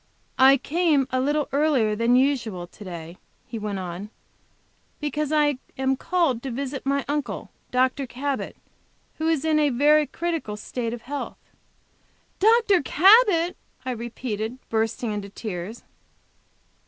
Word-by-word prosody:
"I 265 +1 +8
came 300 -2 +1
a 255 0 +1
little 295 +2 +1
earlier 270 -7 +2
than 230 +3 +3
usual 245 -9 +1
to 195 - -14
day," 170 -2 -8 0.3
he 230 - -6
went 210 -2 -3
on, 185 +2 -6 0.9
"because 295 0 -2
I 295 -3 +2 0.2
am 265 0 +1
called 330 -5 0
to 270 - -5
visit 270 +2 -4
my 275 0 +1
uncle, 290 0 -3 0.2
Dr. 260 +2 +1
Cabot, 275 +3 -3 0.6
who 320 - 0
is 320 -2 +1
in 310 -1 +3
a 295 -1 +3
very 295 +4 +4
critical 330 -11 -3
state 230 +2 -4
of 235 -1 -7
health." 285 +3 -5 1.0
"Dr. 435 -2 +4
Cabot!" 360 - +5 0.3
I 260 - -1
repeated, 235 -1 -4
bursting 225 +1 0
into 205 -1 -4
tears. 200 +1 -6
265 Hz, 135 wpm, -24 LUFS, 225-300 Hz, 1.0 s, I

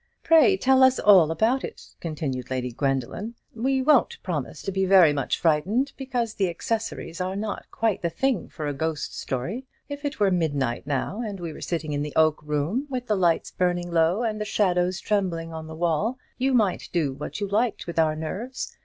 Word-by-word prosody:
"Pray 330 +4 +6
tell 265 -3 +4
us 260 0 +6
all 190 -7 +6
about 225 +11 +1
it," - - -9
continued 140 -6 -4
Lady 125 -1 -2
Gwendoline. 135 - -2 0.2
"We 260 +3 +1
won't 285 -2 +4
promise 155 -5 -4
to 195 - -2
be 190 0 0
very 185 -5 +6
much 135 -3 -1
frightened, 190 - +1
because 250 -5 -2
the 195 -4 0
accessories 200 -1 -3
are 185 +1 -2
not 210 +1 -4
quite 225 -3 0
the 170 - 0
thing 265 +8 -1
for 155 - -6
a 145 - -1
ghost 160 +2 -3
story. 180 - -4 0.2
If 285 +1 -6
it 285 -1 -3
were 200 -2 +3
midnight 145 -8 -1
now, 150 - -2
and 205 -4 -5
we 170 -2 -5
were - - -11
sitting 160 -3 -3
in 145 - -1
the 150 0 -5
oak 155 -1 +3
room, 150 - -1
with 250 -2 -3
the 215 - +1
lights 175 -4 +1
burning 175 -1 -1
low, 170 +6 +2
and 215 -2 -2
the - - +1
shadows 185 -3 +1
trembling 175 -6 -1
on 160 0 -6
the 160 - -8
wall, 175 +9 0 0.2
you 265 0 +2
might 210 -6 +1
do 155 -6 0
what 145 +8 -6
you 205 - -1
liked 215 +3 0
with 170 -1 -3
our 155 -1 +3
nerves. 200 +12 -5
180 Hz, 200 wpm, -25 LUFS, 155-225 Hz, 0.2 s, Pray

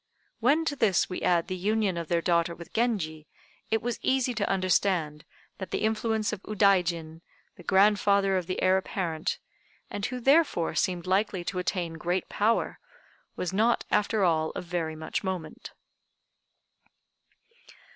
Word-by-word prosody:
When 285 +8 +3
to 290 - -1
this 210 -8 +2
we 180 - -4
add 170 -2 +2
the 185 - -3
union 205 0 0
of 170 -1 -4
their 170 0 0
daughter 170 -1 +1
with 170 0 -12
Genji, 175 -10 -1 0.4
it 220 -1 0
was 240 -1 -2
easy 260 -1 +1
to 215 -3 -1
understand 185 -5 +1 0.3
that 190 - -5
the - - -2
influence 220 0 0
of 200 - -6
Udaijin, 180 -6 +1 0.3
the - - -13
grandfather 200 0 +3
of 180 -2 -1
the 185 - -3
Heir 185 0 +4
apparent, 170 -4 -2 0.5
and 205 - -5
who 250 0 -5
therefore 270 - +3
seemed 175 +1 -1
likely 190 0 0
to 180 +1 -3
attain 175 -3 -2
great 175 +3 -1
power, 220 +3 0 0.6
was 180 0 -3
not 225 +4 +2
after 210 0 +2
all 160 -3 +2
of - - -5
very 165 -2 -3
much 160 +5 -4
moment. 185 -4 -5
190 Hz, 150 wpm, -28 LUFS, 170-215 Hz, 0.6 s, Heir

